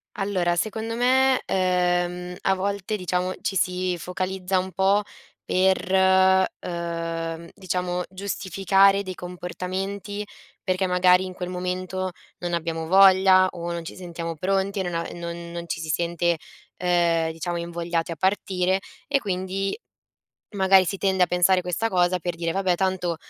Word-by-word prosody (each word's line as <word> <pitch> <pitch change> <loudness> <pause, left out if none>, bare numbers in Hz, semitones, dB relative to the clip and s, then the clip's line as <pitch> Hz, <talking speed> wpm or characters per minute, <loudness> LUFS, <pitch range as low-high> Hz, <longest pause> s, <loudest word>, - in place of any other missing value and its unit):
Allora, 185 -3 0
secondo 220 +4 -2
me, 260 +2 +3
ehm, 180 -1 0
a 190 - +2
volte 200 +2 -2
diciamo, 180 -1 -1
ci 195 - -2
si 180 0 0
focalizza 185 +2 -2
un 185 +1 -2
po' 195 +2 +2 0.4
per, 190 0 +4
uhm, 165 -1 -4
diciamo 180 -2 -2
giustificare 195 +1 +2
dei 185 -1 -5
comportamenti, 185 +3 -5 0.4
perché 185 0 0
magari 180 0 +4
in 185 - -7
quel 180 -1 -5
momento 185 +1 -3 0.3
non 175 -1 -3
abbiamo 165 -1 -2
voglia 190 0 +6
o 170 -1 -5
non 170 -1 -4
ci - - -8
sentiamo 170 -2 -6
pronti, 195 +3 0
non 175 -2 -3
a 165 - -1
non 170 0 -6
non 170 0 -6
ci 160 - -3
si 160 - -6
sente, 170 +1 0 0.4
ehm, 170 -2 +2
diciamo 170 +2 -4
invogliati 170 0 -3
a - - -3
partire 190 +1 +1 0.3
e 280 -1 +2
quindi 195 - -2 0.8
magari 190 -1 +5
si 195 +2 -3
tende 190 -1 +3
a - - -6
pensare 180 +1 +3
questa 180 +5 -1
cosa 180 -2 +2
per 175 0 -3
dire: 165 0 -2
"Vabbè, 190 -1 +1
tanto 185 -2 -1
185 Hz, 145 wpm, -24 LUFS, 175-190 Hz, 0.8 s, voglia